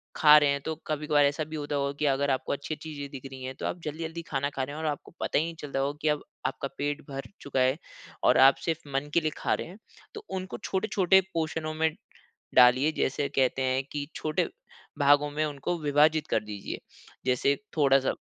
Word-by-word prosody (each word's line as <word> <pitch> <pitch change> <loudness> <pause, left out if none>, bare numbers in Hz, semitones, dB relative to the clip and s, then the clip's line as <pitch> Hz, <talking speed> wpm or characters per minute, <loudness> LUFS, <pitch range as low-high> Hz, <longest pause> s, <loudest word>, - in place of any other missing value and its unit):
खा 150 -1 +8
रहे 145 -1 +3
हैं, 140 0 -1
तो 160 +3 -3
कभी-कभार 150 -1 +2
ऐसा 145 +2 0
भी 155 - -8
होता 145 -1 -3
होगा 140 0 0
कि, 150 - +1
अगर 140 0 +2
आपको 130 - -1
अच्छी 145 +2 -4
चीज़ें 150 -2 -7
दिख 135 -1 -9
रही 130 - -9
हैं, 130 0 -5
तो - - -6
आप 175 - -3
जल्दी-जल्दी 160 +2 -4
खाना 140 0 0
खा 135 - -2
रहे 145 +3 -5
हैं 160 - -5
और 155 - +1
आपको 145 - -8
पता - - +1
ही 155 - +1
नहीं 165 - -6
चलता 140 -2 -3
होगा, 140 +2 -1
कि 155 - 0
अब 150 -1 0 0.2
आपका 135 - -3
पेट 145 +1 -2
भर 135 0 -5 0.2
चुका 135 -2 -2
है 130 +3 +3 0.5
और - - +5
आप 135 - +5
सिर्फ 165 -2 0 0.2
मन 145 +2 -1
के 170 - +5
लिए 155 0 0
खा - - 0
रहे - - -3
हैं। 180 +4 -11 0.4
तो 430 -1 -9
उनको 185 +1 -6
छोटे-छोटे 190 -1 +3
पोर्शनों 160 -1 -2
में 160 0 +1 0.6
डालिए, 130 +4 +6
जैसे 140 -2 -1
कहते 135 -1 +1
हैं, 130 +1 +1
कि 145 -1 -3
छोटे 155 -1 -1 0.5
भागों 145 +1 +5
में 155 +1 -1
उनको 150 +4 -3
विभाजित 150 +1 +3
कर - - 0
दीजिए। 105 -2 -6 0.5
जैसे 130 +2 +2 0.2
थोड़ा-सा 135 -2 +4
145 Hz, 215 wpm, -28 LUFS, 135-155 Hz, 0.6 s, खा